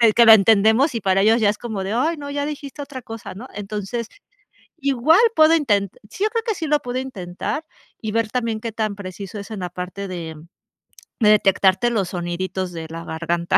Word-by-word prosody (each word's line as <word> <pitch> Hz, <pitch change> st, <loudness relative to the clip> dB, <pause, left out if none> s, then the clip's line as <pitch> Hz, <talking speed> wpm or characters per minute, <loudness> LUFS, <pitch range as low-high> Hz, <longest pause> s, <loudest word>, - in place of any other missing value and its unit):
que 235 Hz, -, +7 dB
lo 225 Hz, -, +9 dB
entendemos, 220 Hz, +6 st, +4 dB
y 230 Hz, -, -2 dB
para 195 Hz, 0 st, +2 dB
ellos 225 Hz, +3 st, +4 dB
ya 205 Hz, -, +4 dB
es 210 Hz, -, -1 dB
como 220 Hz, -5 st, -4 dB
de: 195 Hz, -, -3 dB
"Ay, 310 Hz, +8 st, +1 dB
no, 285 Hz, -1 st, -7 dB
ya 285 Hz, 0 st, -2 dB
dijiste 290 Hz, -1 st, -6 dB
otra 280 Hz, -2 st, -7 dB
cosa", 225 Hz, -4 st, -8 dB
¿no?, 235 Hz, +7 st, -9 dB
entonces, 210 Hz, +3 st, -4 dB, 0.7 s
igual 280 Hz, +2 st, +3 dB, 0.2 s
puedo 315 Hz, +1 st, +6 dB
inten 205 Hz, -, +1 dB, 0.2 s
sí, 395 Hz, -, -2 dB
yo 435 Hz, -, +2 dB
creo 460 Hz, 0 st, -2 dB
que 445 Hz, -, 0 dB
sí 330 Hz, -4 st, -4 dB
lo 300 Hz, 0 st, +2 dB
puedo 250 Hz, -2 st, -4 dB
intentar 240 Hz, -, -5 dB, 0.4 s
y 215 Hz, -2 st, -4 dB
ver 230 Hz, -1 st, 0 dB
también, 230 Hz, -3 st, -2 dB
qué 230 Hz, -, -4 dB
tan 215 Hz, -2 st, -2 dB
preciso 195 Hz, +1 st, -7 dB
es 200 Hz, -, -10 dB
en 215 Hz, -3 st, -5 dB
la 180 Hz, -1 st, -4 dB
parte 185 Hz, +2 st, -6 dB
de 165 Hz, -3 st, -6 dB, 0.8 s
de 210 Hz, -, +5 dB
detectarte, 195 Hz, +1 st, +4 dB
los 200 Hz, -6 st, 0 dB
soniditos 180 Hz, +1 st, -3 dB
de 165 Hz, -1 st, -6 dB
la 165 Hz, +1 st, -7 dB
garganta. 170 Hz, +1 st, 0 dB
215 Hz, 210 wpm, -21 LUFS, 190-260 Hz, 0.8 s, lo